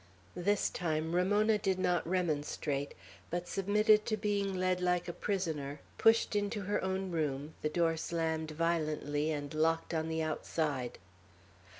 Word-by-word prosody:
This 200 +4 +1
time 160 -2 -1
Ramona 205 +4 +3
did 190 -2 +1
not 180 -3 +1
remonstrate, 150 -5 -1 0.3
but 175 +1 -3
submitted 210 +2 +3
to 215 - +1
being 200 -2 0
led 185 0 +1
like 180 -1 +1
a 175 - -3
prisoner, 160 -9 -2 0.2
pushed 225 -1 +4
into 205 +1 0
her 200 0 -1
own 190 0 -1
room, 150 -2 -2
the 150 - 0
door 165 +1 +2
slammed 160 -1 -1
violently 155 -2 0
and 145 -1 -3
locked 165 +2 +1
on 160 0 -1
the 160 0 -1
outside. 150 -4 -2
170 Hz, 140 wpm, -33 LUFS, 155-195 Hz, 0.3 s, pushed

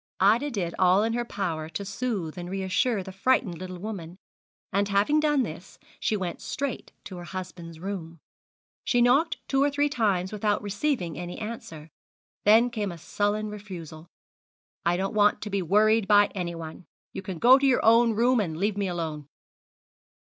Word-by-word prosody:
Ida 225 +9 +4
did 185 -9 -3
all 185 +2 +5
in 225 +1 0
her 240 0 0
power 170 -8 -3
to 200 +4 -5
soothe 195 -5 -3
and 175 0 -6
reassure 195 +3 0
the 190 - -8
frightened 195 -3 +1
little 185 0 -6
woman, 180 -3 -7 0.6
and, 200 +1 +1
having 205 +10 +3
done 295 -3 +2
this, 170 -4 -8 0.2
she 215 - 0
went 180 -3 -4
straight 280 -2 -4
to 185 - -8
her 175 - -7
husband's 175 -3 -8
room. 170 -3 -6 0.6
She 245 - +1
knocked 275 +7 +3
two 270 0 +1
or 285 - +4
three 290 +1 +1
times 200 -9 0
without 210 -1 0
receiving 205 - -2
any 175 0 -6
answer; 165 -9 -7 0.5
then 225 +4 +6
came 210 -4 -2
a 170 - -8
sullen 205 +5 -1
refusal: 175 -6 -9 0.8
'I 175 +1 +2
don't 195 +2 -2
want 210 -1 +3
to 210 - -6
be 200 -1 0
worried 210 +4 +3
by 205 0 +5
anyone. 170 -2 -6 0.3
You - - -5
can 190 -3 -6
go 255 +9 +7
to 275 - +2
your 260 - +2
own 230 +1 +5
room, 240 +3 +3
and 165 -7 -2
leave 205 +3 0
me 200 -1 0
alone.' 160 -5 -4
200 Hz, 175 wpm, -26 LUFS, 175-225 Hz, 0.8 s, go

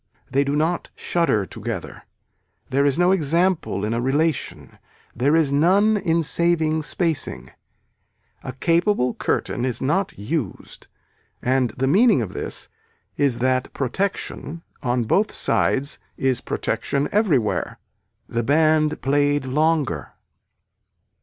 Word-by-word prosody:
They 140 +2 +3
do 140 +1 -1
not 160 +4 0
shudder 165 - +1
together. - - -6 0.7
There 140 +2 +3
is 140 - +1
no 175 +1 +4
example 170 - +1
in 110 - -1
a 115 - -1
relation. 135 - -1 0.4
There 140 +6 +2
is 160 -4 +3
none 190 +9 +4
in 170 -4 +1
saving 160 -1 +1
spacing. 160 -1 -2 0.9
A 130 - -6
capable 165 - +1
curtain 120 - -2
is 125 -2 -1
not 185 +9 -1
used 115 - -5 0.5
and 130 -1 +1
the 130 - 0
meaning 210 - +4
of - - -7
this - - -6 0.5
is 140 -5 +1
that 130 -1 +1
protection 165 +2 -3 0.2
on 125 -2 0
both 200 - +1
sides 140 +2 0 0.2
is 130 -2 0
protection 140 +1 -1
everywhere. 165 - +1 0.5
The 120 - -1
band 155 +3 +2
played 145 +1 +2
longer. 145 - 0
145 Hz, 120 wpm, -22 LUFS, 130-165 Hz, 0.9 s, no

